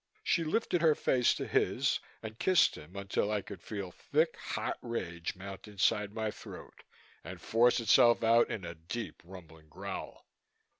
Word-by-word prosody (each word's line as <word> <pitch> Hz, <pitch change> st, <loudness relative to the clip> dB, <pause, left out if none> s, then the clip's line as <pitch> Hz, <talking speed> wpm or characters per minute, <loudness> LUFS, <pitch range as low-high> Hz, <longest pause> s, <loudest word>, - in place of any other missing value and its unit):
She 170 Hz, -, +2 dB
lifted 175 Hz, +1 st, 0 dB
her 160 Hz, -2 st, +5 dB
face 125 Hz, -4 st, +2 dB
to -, -, -4 dB
his -, -, +1 dB, 0.2 s
and 110 Hz, 0 st, -8 dB
kissed 185 Hz, -2 st, +4 dB
him 75 Hz, +6 st, -12 dB
until 100 Hz, +1 st, -1 dB
I 105 Hz, -2 st, -1 dB
could 90 Hz, -, -9 dB
feel 100 Hz, -4 st, -6 dB
thick, -, -, 0 dB
hot -, -, -4 dB
rage 85 Hz, -8 st, -4 dB
mount 95 Hz, +1 st, -9 dB
inside 105 Hz, 0 st, +1 dB
my 110 Hz, 0 st, -2 dB
throat -, -, -11 dB, 0.4 s
and -, -, -8 dB
force 120 Hz, +2 st, +3 dB
itself 115 Hz, +1 st, +5 dB
out 115 Hz, +1 st, +5 dB
in 95 Hz, -5 st, -4 dB
a 85 Hz, -, -5 dB
deep 85 Hz, +9 st, -6 dB
rumbling 80 Hz, -4 st, -13 dB
growl. -, -, -7 dB
105 Hz, 160 wpm, -32 LUFS, 90-120 Hz, 0.4 s, her